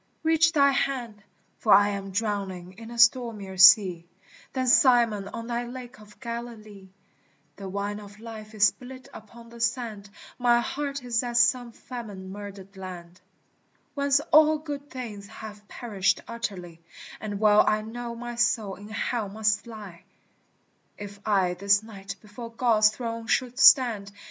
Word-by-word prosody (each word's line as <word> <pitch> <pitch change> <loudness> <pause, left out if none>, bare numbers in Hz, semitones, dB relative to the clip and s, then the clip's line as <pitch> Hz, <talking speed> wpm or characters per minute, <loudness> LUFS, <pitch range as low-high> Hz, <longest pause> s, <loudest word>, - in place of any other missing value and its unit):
reach 320 0 +4
thy 280 -2 +5
hand, 250 -6 -2 0.4
For 215 - +1
I 205 +1 +7
am 195 -1 -5
drowning 195 -3 -3
in 225 0 -10
a 235 - -9
stormier 220 -4 +2
sea 185 -3 +6 0.5
Than 260 -1 -1
Simon 235 -5 +4
on 230 +3 -7
thy 240 0 -3
lake 250 -1 -9
of 210 0 -17
Galilee: 230 -5 -8 0.7
The 195 -1 -7
wine 200 +2 -3
of 205 0 -13
life 220 -1 -10
is 205 -1 +5
spilt 255 +5 -4
upon 230 +2 -13
the 235 0 -13
sand, 230 -4 -2 0.3
My 240 -1 +4
heart 280 +2 -4
is 235 -2 0
as 240 -1 0
some 240 0 +2
famine 210 -7 -9
murdered 200 -1 -10
land, 180 -2 -10 0.7
Whence 280 -1 +2
all 310 0 +6
good 290 -2 -7
things 220 -6 -7
have 210 -1 -11
perished 200 -3 -1
utterly, 185 -8 -6 0.4
And 205 -2 -5
well 210 -1 +5
I 215 0 +2
know 235 +1 -6
my 240 0 -7
soul 220 -4 +1
in 205 +2 -12
Hell 220 0 -2
must 210 +2 0
lie 205 -7 -10 1.0
If 205 -1 -9
I 190 -4 +2
this 200 +3 +2
night 195 -3 -9
before 225 +2 -10
God's 230 -3 +3
throne 230 0 -6
should 250 -1 0
stand. 225 -7 +5
220 Hz, 150 wpm, -26 LUFS, 200-240 Hz, 1.0 s, I